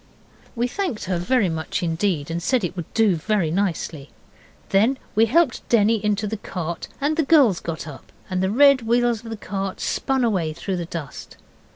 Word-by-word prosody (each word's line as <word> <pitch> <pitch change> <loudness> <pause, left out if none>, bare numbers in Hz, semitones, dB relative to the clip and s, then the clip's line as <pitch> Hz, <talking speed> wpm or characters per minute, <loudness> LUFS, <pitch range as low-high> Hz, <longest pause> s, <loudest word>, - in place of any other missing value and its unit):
We 240 +1 0
thanked 325 - -3
her 180 -1 -1
very 225 +3 +2
much 160 +3 -3
indeed, 165 -2 -1
and 170 +1 -2
said 250 +5 +1
it 180 0 -3
would 175 -4 -6
do 220 -5 +4
very 175 -1 0
nicely. 165 -6 -2 0.6
Then 220 +7 +3 0.2
we 225 +2 +4
helped 285 +1 +1
Denny 220 -2 +3
into 210 0 0
the 220 +1 -3
cart, 170 -4 -5
and 295 +3 0
the - - +4
girls 275 - +4
got 165 -1 -5
up, 145 -3 -11 0.2
and 185 -3 -2
the 190 - +1
red 275 +4 +5
wheels 235 0 +1
of 230 - -9
the 225 - -5
cart 195 -1 -4
spun 265 -1 0
away 185 -9 0
through 185 +3 -4
the 175 - -3
dust. 165 -5 -8
205 Hz, 190 wpm, -22 LUFS, 170-235 Hz, 0.6 s, red